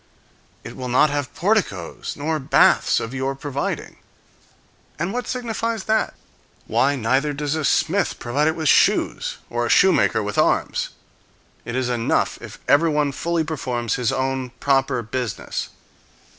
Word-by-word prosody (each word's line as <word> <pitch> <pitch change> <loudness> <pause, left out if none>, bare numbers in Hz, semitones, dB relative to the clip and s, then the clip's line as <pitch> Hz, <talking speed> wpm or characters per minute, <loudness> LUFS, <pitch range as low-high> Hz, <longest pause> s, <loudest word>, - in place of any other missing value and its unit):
"It - - -9
will 130 -1 -5
not 135 +4 +4
have 145 -2 -2
porticoes 180 - -1
nor 155 +2 -1
baths 135 - +4
of 115 +2 -5
your 135 +1 -2
providing." 140 0 -4 1.0
And 170 +6 -2
what 245 0 -3
signifies 230 -3 -2
that? 220 0 0 0.5
Why, 130 +6 +2
neither 135 +4 +1
does 145 0 -2
a 155 -1 -2
smith 170 +6 +1
provide 140 +6 0
it 160 - +1
with 160 -2 -2
shoes, - - +3
or 120 0 -2
a - - -5
shoemaker 115 - +4
with 105 0 -2
arms. - - +1 0.8
It 120 - -4
is 130 -1 0
enough 120 -2 0
if - - -9
everyone 150 -1 +3
fully 170 +3 -1
performs 125 -7 -2
his 125 -4 0
own 130 -1 -1
proper 135 -3 +1
business. 120 -1 -4
140 Hz, 145 wpm, -22 LUFS, 125-160 Hz, 1.0 s, not